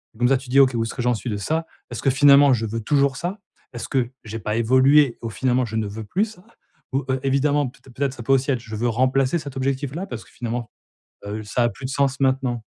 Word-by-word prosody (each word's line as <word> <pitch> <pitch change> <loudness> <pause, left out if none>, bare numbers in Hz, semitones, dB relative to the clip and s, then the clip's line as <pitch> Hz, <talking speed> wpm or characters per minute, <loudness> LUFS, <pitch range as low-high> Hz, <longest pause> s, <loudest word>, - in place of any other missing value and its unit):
et - - -18
comme 120 +1 +2
ça 135 - +4
tu 130 0 -12
dis: 135 +2 +4
«OK, 130 -1 +5
où 115 - +1
est-ce 115 - -4
que 125 - -3
j'en 125 0 +2
suis 120 - -5
de 105 - -2
ça? 160 +11 -1 0.3
Est-ce 120 - -5
que - - +2
finalement 140 +1 +6
je 115 -2 0
veux 115 +1 -3
toujours 140 +3 +2
ça? 180 +4 -4 0.4
Est-ce 120 - -6
que, 125 -3 0
j'ai 110 +1 -6
pas 105 0 -2
évolué, 130 +3 +4
au 115 - -4
finalement 125 +2 0
je 110 -1 -6
ne 110 - 0
veux 110 +2 -6
plus 195 - 0
ça?», 210 -5 -14 0.5
ou, 135 0 0
heu, 130 0 +1
évidemment 140 +1 +2
peut - - -20
êt - - -13
peut-être 135 +1 -1
ça 125 - -9
peut 135 - -1
aussi 135 +1 +1
être: 130 - 0
«Je 110 -2 -8
veux 120 +3 0
remplacer 130 +5 +2
cet 140 -3 -8
objectif-là 135 +6 -2
parce 115 -2 -7
que - - -21
finalement, 120 -1 -5 0.5
heu, 105 +1 -5
ça 115 +4 0
a 120 - +3
plus 120 +4 -12
de - - -3
sens 135 0 0
maintenant» 130 -3 0
130 Hz, 270 wpm, -22 LUFS, 115-140 Hz, 0.5 s, finalement